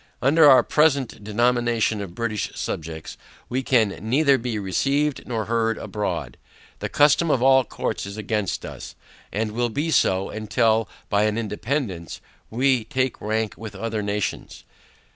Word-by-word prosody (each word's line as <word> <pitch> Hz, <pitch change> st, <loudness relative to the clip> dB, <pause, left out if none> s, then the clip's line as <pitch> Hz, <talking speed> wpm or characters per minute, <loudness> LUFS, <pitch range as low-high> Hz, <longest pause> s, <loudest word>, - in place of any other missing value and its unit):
Under 150 Hz, +2 st, +6 dB
our 130 Hz, -, +7 dB
present 140 Hz, -8 st, +1 dB
denomination 120 Hz, 0 st, +1 dB
of 90 Hz, -3 st, -7 dB
British 110 Hz, -2 st, -2 dB
subjects, 80 Hz, 0 st, -5 dB, 0.3 s
we 130 Hz, +2 st, -1 dB
can 120 Hz, -5 st, +3 dB
neither 135 Hz, +5 st, +3 dB
be 115 Hz, -2 st, -3 dB
received 135 Hz, -, 0 dB
nor 115 Hz, -3 st, -2 dB
heard 115 Hz, -1 st, 0 dB
abroad: 85 Hz, -, -4 dB, 0.4 s
The -, -, -3 dB
custom 150 Hz, +3 st, +4 dB
of 130 Hz, -4 st, +2 dB
all 130 Hz, 0 st, +6 dB
courts 100 Hz, -, -4 dB
is 100 Hz, +1 st, -8 dB
against 105 Hz, -2 st, -2 dB
us, -, -, -9 dB, 0.4 s
and 110 Hz, +1 st, -2 dB
will 120 Hz, +2 st, -1 dB
be 145 Hz, +8 st, -2 dB
so, 95 Hz, -9 st, +2 dB
until, 110 Hz, +1 st, +1 dB, 0.2 s
by 105 Hz, 0 st, +2 dB
an 105 Hz, 0 st, 0 dB
independance, 110 Hz, -, -3 dB, 0.3 s
we 130 Hz, 0 st, +2 dB
take 130 Hz, -3 st, -1 dB
rank 110 Hz, 0 st, -1 dB
with 110 Hz, -1 st, -8 dB
other 110 Hz, +1 st, -3 dB
nations. 105 Hz, 0 st, -3 dB
115 Hz, 145 wpm, -23 LUFS, 105-130 Hz, 0.4 s, our